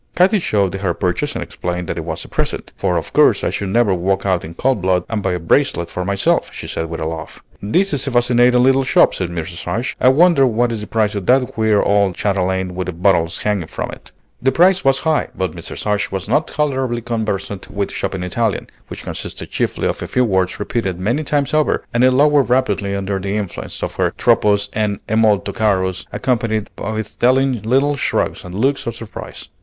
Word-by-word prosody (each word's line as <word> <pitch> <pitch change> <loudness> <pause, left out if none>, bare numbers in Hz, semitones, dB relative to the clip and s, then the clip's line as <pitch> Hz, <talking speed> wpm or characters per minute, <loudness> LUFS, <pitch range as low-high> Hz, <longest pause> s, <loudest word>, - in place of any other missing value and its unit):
Katy 190 +4 +4
showed 100 - 0
her 95 -3 -1
purchase 90 -2 -1
and - - -2
explained 90 0 -4
that - - -3
it - - -4
was - - -5
a - - -11
present; - - -3
"for - - 0
of - - -5
course - - +4
I - - 0
should 100 - -3
never 115 -1 +3
walk 95 +2 0
out 95 -3 +1
in 80 +1 -9
cold 130 -2 0
blood 90 -1 +1
and 110 -2 -2
buy 90 - 0
a 90 - -2
bracelet 85 - +1
for 90 - -3
myself," 100 +1 +1
she - - -8
said 80 - -3
with 85 - -5
a 80 - -3
laugh. 80 0 -6 0.2
"This 175 - +1
is 145 0 +1
a - - -1
fascinating 125 0 +4
little 135 +1 +4
shop," 130 - +4
said 90 -2 -3
Mrs. 85 0 -6
Ashe. 115 +9 -2
"I - - +5
wonder 150 -1 +5
what 120 0 +1
is 110 -2 -3
the 105 - -7
price 110 -2 0
of 100 -3 -4
that 125 0 +4
queer 110 -2 +2
old 100 -2 +2
chatelaine 95 -2 -1
with 90 0 -4
the 90 - -3
bottles 85 -2 +2
hanging 100 -6 -1
from - - -5
it." - - -12 0.3
The 135 +2 +3
price 185 +6 +4
was 135 0 +4
high; 160 -1 +2
but 95 -3 -1
Mrs. - - -7
Ashe 105 -1 0
was 95 0 -4
now 125 - +4
tolerably 135 -6 -2
conversant 105 -4 -3
with 100 0 -3
shopping 95 -2 -3
Italian, 105 +4 -2 0.2
which - - -9
consists - - -6
chiefly - - -1
of - - -3
a - - -4
few 125 - +2
words 95 -4 0
repeated 100 -4 -2
many 120 +11 0
times 145 0 0
over, 155 -1 +2
and 120 +1 +2
it 130 - +7
lowered 145 +1 +3
rapidly 105 -6 +1
under 100 0 -2
the 100 +2 -2
influence 100 -4 -5
of - - -4
her - - +2
troppo's 100 -1 +3
and 105 -2 0
è 110 - -1
molto 105 -3 +2
caro's, 95 -4 0
accompanied 115 -4 -1
with 110 +1 -4
telling 130 -1 +3
little 135 +6 +2
shrugs - - -1
and 90 0 -8
looks 135 +6 0
of 115 - -3
surprise. 115 -2 -9
105 Hz, 215 wpm, -18 LUFS, 95-125 Hz, 0.3 s, it